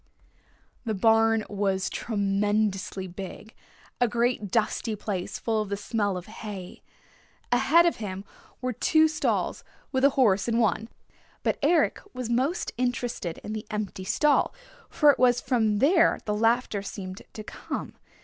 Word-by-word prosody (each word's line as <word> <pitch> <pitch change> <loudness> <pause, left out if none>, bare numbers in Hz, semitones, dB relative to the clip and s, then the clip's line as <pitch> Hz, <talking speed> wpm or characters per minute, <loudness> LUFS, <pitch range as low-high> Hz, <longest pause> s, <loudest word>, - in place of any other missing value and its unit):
The 220 -3 -2
barn 225 +2 +4
was 195 -2 -1
tremendously 205 -2 -1
big, 190 +4 -9 0.5
a 245 - +4
great 235 -2 0
dusty 220 +1 0
place 195 -3 -4
full 220 -2 0
of 210 - -5
the 200 - -2
smell 205 -2 -1
of 180 - -7
hay. 210 -4 -8 0.7
Ahead 275 +8 +5
of 340 - +2
him 195 -2 -5 0.4
were 255 0 -1
two 315 +7 +4
stalls, 310 0 -1 0.3
with 260 -1 0
a 280 - +7
horse 205 -6 +3
in 230 -1 +1
one. 220 0 +1 0.5
But - - 0
Eric 325 +4 +2
was 250 -2 -3
most 265 +9 0
interested 245 -8 -2
in 215 - -5
the 215 -1 -5
empty 210 -3 -4
stall, 295 +9 +2 0.3
for 295 -2 +5
it - - -4
was 245 -1 +4
from 220 -5 +1
there 325 - +4
the 210 - 0
laughter 225 -1 +1
seemed 190 -1 -7
to 215 - -7
come. - - -6
220 Hz, 150 wpm, -27 LUFS, 200-245 Hz, 0.7 s, a